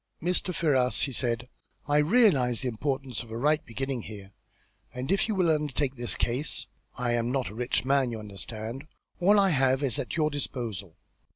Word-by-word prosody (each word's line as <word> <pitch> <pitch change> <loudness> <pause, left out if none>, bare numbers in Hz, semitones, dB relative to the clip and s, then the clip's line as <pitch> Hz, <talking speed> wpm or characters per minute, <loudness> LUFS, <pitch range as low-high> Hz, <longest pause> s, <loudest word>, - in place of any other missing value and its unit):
"Mr. 180 +2 0
Ferrars," 135 -7 +2
he 140 - 0
said, 120 -1 -1 0.4
"I 145 0 +4
realise 150 - +4
the - - -1
importance 130 +1 -2
of 120 - -11
a 110 - -5
right 150 +5 +2
beginning 130 +1 -3
here, 100 -2 -9 0.6
and 125 +6 -4
if 195 - +2
you 215 - -1
will 180 -4 +3
undertake 150 -3 0
this 120 -2 -1
case 120 -1 -1 0.3
I 125 -1 0
am 120 0 0
not 130 -1 -1
a - - -10
rich 125 +2 -1
man, 135 -1 +3
you 115 - -4
understand 110 +5 -6 0.3
all 200 +4 +5
I 195 -1 +4
have 135 -1 +2
is 130 -7 0
at - - -3
your 155 -1 +2
disposal. 115 - -4
130 Hz, 185 wpm, -28 LUFS, 120-150 Hz, 0.6 s, all